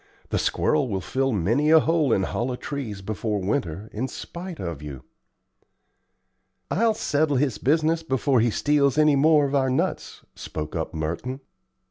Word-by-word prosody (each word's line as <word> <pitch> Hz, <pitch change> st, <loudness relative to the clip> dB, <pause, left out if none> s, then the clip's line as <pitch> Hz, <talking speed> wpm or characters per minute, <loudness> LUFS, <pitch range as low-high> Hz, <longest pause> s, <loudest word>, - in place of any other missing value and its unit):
"The -, -, 0 dB
squirrel 150 Hz, -3 st, +1 dB
will 95 Hz, -3 st, -1 dB
fill 135 Hz, +8 st, -1 dB
many 115 Hz, -, +1 dB
a 160 Hz, 0 st, +8 dB
hole 155 Hz, -4 st, +1 dB
in 95 Hz, -, +2 dB
hollow 125 Hz, +6 st, -2 dB
trees 125 Hz, -8 st, -6 dB
before 105 Hz, +1 st, -2 dB
winter, 95 Hz, -, -2 dB
in 125 Hz, +5 st, -2 dB
spite 170 Hz, +5 st, -8 dB
of 85 Hz, -5 st, -5 dB
you." 70 Hz, -4 st, -8 dB, 1.7 s
"I'll 220 Hz, +3 st, +2 dB
settle 150 Hz, -6 st, +1 dB
his 130 Hz, -6 st, 0 dB
business 160 Hz, +5 st, +2 dB
before 135 Hz, -4 st, +1 dB
he 120 Hz, +2 st, +3 dB
steals 145 Hz, +3 st, +2 dB
many 150 Hz, -1 st, +5 dB
more 150 Hz, +1 st, +4 dB
of 140 Hz, -, -3 dB
our 135 Hz, -2 st, +2 dB
nuts," 130 Hz, -, -2 dB
spoke 75 Hz, 0 st, -6 dB
up 80 Hz, 0 st, -3 dB
Merton. 85 Hz, -, -3 dB
130 Hz, 155 wpm, -24 LUFS, 100-150 Hz, 1.7 s, a